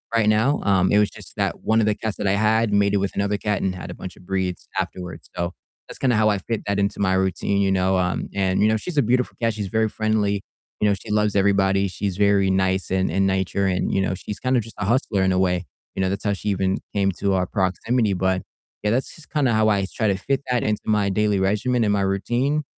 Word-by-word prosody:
right 115 -2 +3
now, 110 +7 +2
um, 95 -2 +3
it 105 - +5
was 105 - +3
just - - -13
that - - -1
one 110 +1 +2
of - - +2
the 105 -1 +1
cats 110 -1 -3
that 100 - -2
I 95 - +3
had 110 +1 +2
mated 100 0 +3
with 100 - -2
another 100 +1 0
cat 105 -1 -1
and 95 -1 -1
had 90 - -7
a - - -6
bunch 90 - -8
of - - -18
breeds 95 -1 -2
afterwards, 90 -1 -5
so, 85 +1 -2 0.4
that's - - -9
kinda 125 -3 +2
how 110 0 +3
I 105 - +2
fit 110 +3 -4
that 100 0 0
into 100 0 -1
my 95 -2 +2
routine, 95 +1 0
you 95 -1 +2
know, 95 0 +2
um, 90 0 -1
and 95 -1 +1
you 105 - +5
know, 110 - +2
she's 155 +9 -6
a - - +6
beautiful 125 +1 0
cat, 115 -1 +1
she's 105 -2 -4
very 110 +2 +1
friendly, 105 -2 0 0.4
you 105 - +4
know, - - +3
she 100 - -8
loves 105 -1 +1
everybody, 100 0 +3
she's 95 0 -3
very 100 -1 +3
nice 95 0 0
in 95 0 +1
in 95 +4 +1
nature 95 +1 0
and, 90 -1 0
you - - +2
know, 95 - 0
she's 105 +3 -7
kind 130 +1 0
of - - +2
just 115 - -11
a 100 - -1
hustler 105 -3 +1
in 95 - +2
a 90 - +2
way, 90 -1 +1 0.3
you - - -1
know, 95 - +2
that's 100 +2 -3
how 100 - +2
she 105 +1 -3
even 95 -1 0 0.2
came 100 -1 +2
to 100 +2 -1
our 90 -1 +1
proximity, 100 +4 0
but 95 0 0 0.4
yeah, 105 - +1
that's 125 +4 -1
just 160 - -14
kinda 145 -5 +2
how 110 0 +3
I 100 -2 +2
try 110 - +1
to 100 - +2
fit 135 +8 -1
that 125 -1 +2
into 105 -1 -1
my 105 -2 +2
daily 105 0 +1
regimen 105 +6 +1
and 105 - +2
my 100 - +1
routine 120 +10 0
100 Hz, 260 wpm, -23 LUFS, 95-110 Hz, 0.4 s, a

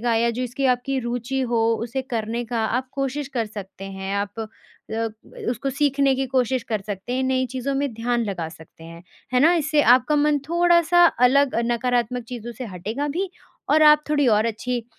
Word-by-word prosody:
का 235 0 +1
या 235 +1 +2
जो 240 +2 -3
इसकी 250 +2 -3
आपकी 255 +2 0
रूचि 245 +2 -3
हो 235 -1 +1 0.2
उसे 240 +3 -3
करने 230 +1 -2
का 235 0 -3
आप 250 +4 -2
कोशिश 275 +1 -3
कर 230 -3 0
सकते 200 -2 -9
हैं 195 0 -5
आप 200 +2 -3
अ - - -2 0.5
अ, 225 0 -1 0.4
उसको 245 +3 -2
सीखने 275 0 +2
की 265 +1 -1
कोशिश 255 -1 0
कर 215 -2 -1
सकते 205 +3 -5
हैं 260 - 0
नई 260 0 +1
चीज़ों 260 +2 -3
में 280 -1 -1
ध्यान 235 +1 -1
लगा 180 -6 -3
सकते 160 0 -15
हैं, 165 +1 -11 0.3
है 250 - +3
ना? 320 +5 +6
इससे 305 -2 +2
आपका 255 +5 +4
मन 295 0 +3
थोड़ा-सा 345 0 +4 0.2
अलग 280 +1 +3 0.2
नकारात्मक 245 0 0
चीज़ों 240 -1 -6
से 255 - -4
हटेगा 220 +8 -4
भी 360 +6 -2 0.4
और 310 +1 +5
आप 300 0 +6
थोड़ी 290 -2 +2
और 215 0 +3
अच्छी 235 +1 -3
250 Hz, 195 wpm, -23 LUFS, 225-275 Hz, 0.5 s, ना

